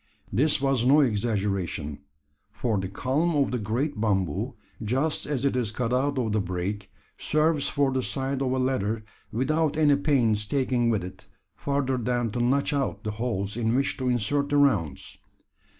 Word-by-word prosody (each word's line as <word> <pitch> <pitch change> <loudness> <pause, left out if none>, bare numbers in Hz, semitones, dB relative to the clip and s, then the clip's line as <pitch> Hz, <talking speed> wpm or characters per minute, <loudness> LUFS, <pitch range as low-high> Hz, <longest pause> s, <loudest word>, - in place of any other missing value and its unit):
This 145 +9 +3
was 135 -3 +1
no 140 +4 +6
exaggeration: 100 - -1 0.5
for 110 -2 -1
the 95 0 -3
culm 145 - 0
of 135 - +2
the 125 - -1
great 115 +4 -2
bamboo, 95 -8 0 0.3
just 135 +8 0
as 140 -3 -1
it 140 - +1
is 120 -4 0
cut 115 +1 -2
out 140 +2 +1
of 115 -4 0
the 105 0 +1
brake, 95 +2 -4 0.3
serves 155 -1 +2
for 140 -2 +1
the 130 0 0
side 135 +1 -2
of 130 -2 0
a 130 - 0
ladder, 115 -4 0 0.3
without 155 +6 0
any 150 -2 +5
pains 120 -8 +1
taken 125 -3 +1
with 110 -5 +1
it, 90 - -10 0.3
further 140 -2 -1
than 120 -1 -1
to 120 - -3
notch 140 +5 +2
out 135 -7 -1
the 105 - -2
holes 105 -3 -2
in 115 0 0
which 135 +2 +1
to 130 -1 -1
insert 135 +5 +1
the 145 - +2
rounds. 95 - +1
125 Hz, 175 wpm, -26 LUFS, 105-140 Hz, 0.5 s, no